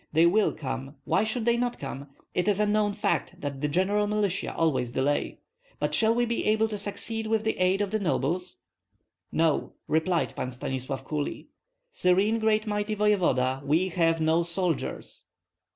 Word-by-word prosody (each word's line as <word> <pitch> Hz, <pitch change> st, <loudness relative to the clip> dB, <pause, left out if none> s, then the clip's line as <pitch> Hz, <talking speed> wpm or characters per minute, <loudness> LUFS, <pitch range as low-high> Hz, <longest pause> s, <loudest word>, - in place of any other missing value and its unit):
"They 160 Hz, +2 st, +5 dB
will 205 Hz, +5 st, +4 dB
come; 135 Hz, 0 st, -5 dB
why 195 Hz, -, +2 dB
should 220 Hz, +1 st, -2 dB
they 235 Hz, 0 st, +3 dB
not 245 Hz, 0 st, -1 dB
come? 140 Hz, 0 st, -6 dB, 0.3 s
It 180 Hz, -, 0 dB
is 205 Hz, -1 st, +2 dB
a 210 Hz, -, +3 dB
known 205 Hz, -1 st, +1 dB
fact 165 Hz, -, -1 dB
that 140 Hz, -2 st, -5 dB
the 150 Hz, -, +1 dB
general 195 Hz, +7 st, +1 dB
militia 205 Hz, -2 st, -1 dB
always 140 Hz, -7 st, 0 dB
delay. 135 Hz, +3 st, -1 dB, 0.4 s
But -, -, -1 dB
shall 225 Hz, 0 st, +4 dB
we 240 Hz, 0 st, +2 dB
be 235 Hz, 0 st, -1 dB
able 220 Hz, +1 st, +3 dB
to 210 Hz, -1 st, -4 dB
succeed 220 Hz, +2 st, -3 dB
with 220 Hz, -1 st, +1 dB
the 220 Hz, -, 0 dB
aid 185 Hz, +2 st, +2 dB
of 205 Hz, -, -1 dB
the 215 Hz, -, 0 dB
nobles?" 180 Hz, 0 st, -1 dB, 0.7 s
"No," 160 Hz, -2 st, +1 dB
replied 160 Hz, +2 st, +1 dB
Pan 125 Hz, -, -3 dB
Stanislav, 130 Hz, +1 st, -4 dB
coolly. 150 Hz, -2 st, -4 dB, 0.4 s
"Serene 200 Hz, -, +2 dB
great 220 Hz, 0 st, +2 dB
mighty 210 Hz, 0 st, -1 dB
voevoda, 170 Hz, -12 st, +2 dB
we 160 Hz, +6 st, +2 dB
have 165 Hz, -2 st, +2 dB
no 160 Hz, +1 st, +3 dB
soldiers." 170 Hz, -2 st, -3 dB
185 Hz, 170 wpm, -27 LUFS, 150-210 Hz, 0.7 s, They